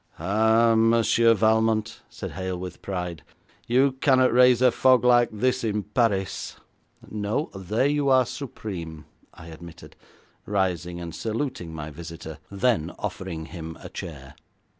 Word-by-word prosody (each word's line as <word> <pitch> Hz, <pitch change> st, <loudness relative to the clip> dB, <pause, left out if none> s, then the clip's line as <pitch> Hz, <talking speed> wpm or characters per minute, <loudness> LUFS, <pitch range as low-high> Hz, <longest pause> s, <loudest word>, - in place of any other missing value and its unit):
'Ah, 110 Hz, +5 st, +3 dB
Monsieur 115 Hz, 0 st, +4 dB
Valmont,' 110 Hz, 0 st, +1 dB
said -, -, -7 dB
Hale 95 Hz, -1 st, -4 dB
with 90 Hz, -1 st, -8 dB
pride, 90 Hz, -4 st, -4 dB, 0.5 s
'you 130 Hz, +3 st, +3 dB
cannot 130 Hz, -3 st, +4 dB
raise 125 Hz, -1 st, +6 dB
a 130 Hz, -1 st, +5 dB
fog 130 Hz, 0 st, +4 dB
like 120 Hz, -1 st, +5 dB
this 125 Hz, +4 st, 0 dB
in 105 Hz, -2 st, -1 dB
Paris!' 105 Hz, -3 st, -1 dB, 0.5 s
'No. 105 Hz, +7 st, -3 dB
There 95 Hz, +6 st, -1 dB
you 145 Hz, -1 st, +1 dB
are 130 Hz, -1 st, +5 dB
supreme,' 90 Hz, -, -7 dB, 0.3 s
I 80 Hz, -, -12 dB
admitted, 85 Hz, +1 st, -12 dB, 0.5 s
rising 90 Hz, -3 st, -1 dB
and 85 Hz, -2 st, -7 dB
saluting 110 Hz, -, -4 dB
my 80 Hz, -1 st, -7 dB
visitor, 80 Hz, 0 st, -9 dB
then 100 Hz, -5 st, 0 dB
offering 85 Hz, -4 st, -5 dB
him 80 Hz, -1 st, -8 dB
a -, -, -10 dB
chair. 70 Hz, -4 st, -8 dB
105 Hz, 135 wpm, -25 LUFS, 85-120 Hz, 0.5 s, raise